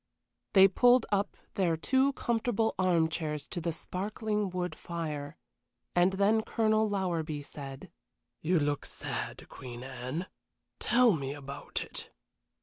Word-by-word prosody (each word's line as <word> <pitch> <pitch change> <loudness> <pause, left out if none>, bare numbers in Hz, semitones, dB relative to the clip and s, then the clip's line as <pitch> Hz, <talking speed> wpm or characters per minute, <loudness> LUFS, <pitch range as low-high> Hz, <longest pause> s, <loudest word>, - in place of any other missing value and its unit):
They 195 -1 +9
pulled 245 +5 +5
up 200 0 0 0.2
their 170 -4 +1
two 265 - +3
comfortable 225 -3 0
arm 175 -3 +4
chairs 150 -3 -3
to 175 - -4
the 170 +1 -1
sparkling 210 +4 -2
wood 180 0 -2
fire, 150 -4 -5 0.6
and 175 +2 +4
then 200 +3 +3
Colonel 220 -1 +2
Lowerby 165 -7 -1
said: 135 -2 -9 0.5
"You 175 +3 +2
look 145 -1 -1
sad, - - -5
Queen 125 -1 -9
Anne. 130 +6 -4 0.5
Tell 245 -1 +5
me 140 -5 -2
about 140 0 -4
it." - - -7
180 Hz, 130 wpm, -31 LUFS, 150-210 Hz, 0.6 s, They